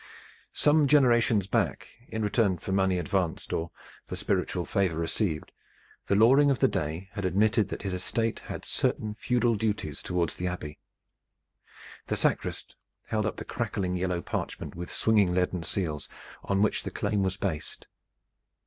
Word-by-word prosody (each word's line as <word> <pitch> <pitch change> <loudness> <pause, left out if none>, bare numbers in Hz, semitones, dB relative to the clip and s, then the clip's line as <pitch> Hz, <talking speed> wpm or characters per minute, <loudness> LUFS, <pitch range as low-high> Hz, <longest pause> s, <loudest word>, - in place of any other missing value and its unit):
Some 150 0 +4
generations 120 -8 +4
back 95 - 0 0.2
in 110 0 -3
return 105 -3 +2
for 95 - -6
money 95 -1 +2
advanced 90 0 -1
or 85 +1 -1 0.4
for - - -4
spiritual - - -1
favor 95 -5 0
received 80 0 -1 0.6
the 100 - +3
Loring 135 +7 +6
of 135 - +2
the 135 - +4
day 80 0 -3
had 100 -1 -5
admitted 105 +4 +2
that - - -5
his 95 -2 -2
estate 115 +5 -1
had - - -7
certain 105 -1 -1
feudal 120 +1 +1
duties 105 -9 -2
toward 85 -2 0
the 90 - -3
Abbey. 75 -4 -5 1.3
The - - -1
sacrist - - -1 0.3
held 110 -2 0
up - - -3
the - - -6
crackling 90 -2 -2
yellow 90 -1 -1
parchment - - -4
with 90 +1 -7
swinging 105 -5 +3
leaden 90 -1 +1
seals 80 -3 -2 0.3
on 100 +1 +1
which 105 - +1
the - - -4
claim 105 - -1
was 95 0 0
based. 85 -7 -4
95 Hz, 155 wpm, -28 LUFS, 90-110 Hz, 1.3 s, Loring